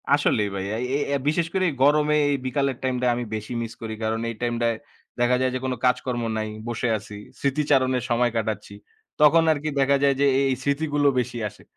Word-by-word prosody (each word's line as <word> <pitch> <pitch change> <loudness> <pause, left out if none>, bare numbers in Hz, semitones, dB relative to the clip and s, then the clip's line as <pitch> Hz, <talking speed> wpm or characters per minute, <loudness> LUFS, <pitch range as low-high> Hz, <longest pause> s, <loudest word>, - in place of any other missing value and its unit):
আসলেই 110 -8 +1
ভাই, 95 - -3
অ্যা 110 - -2 0.2
এই 145 - -1
এই 140 - 0
বিশেষ 160 +2 +1
করে 190 -1 +1
এই - - -4
গরমে, 150 +1 +4
এই - - +2
বিকালের 135 -1 0
টাইমটা 125 -1 0
আমি 120 - -3
বেশি 110 +3 -6
মিস 115 -1 -5
করি, 110 -1 -5
কারণ 110 +1 -1
এই 115 - -5
টাইমটায় 120 -1 0 0.4
দেখা 120 +1 +3
যায় 130 -1 +1
যে, - - -1
কোনো 130 -1 -1
কাজকর্ম 125 -1 0
নাই, 110 - -2 0.2
বসে 120 +1 -2
আছি 105 0 -10 0.2
স্মৃতিচারণের 135 -3 +1
সময় 120 0 +2
কাটাচ্ছি। 105 -2 -3 0.5
তখন 160 +2 +6
আরকি 155 0 -1
দেখা 140 +1 +4
যায় 140 -1 +4
যে, - - +5
এ - - +2
এই - - +1
স্মৃতিগুলো 145 0 +1
বেশি 125 -1 -3
আসে। - - -19
125 Hz, 205 wpm, -24 LUFS, 115-145 Hz, 0.5 s, তখন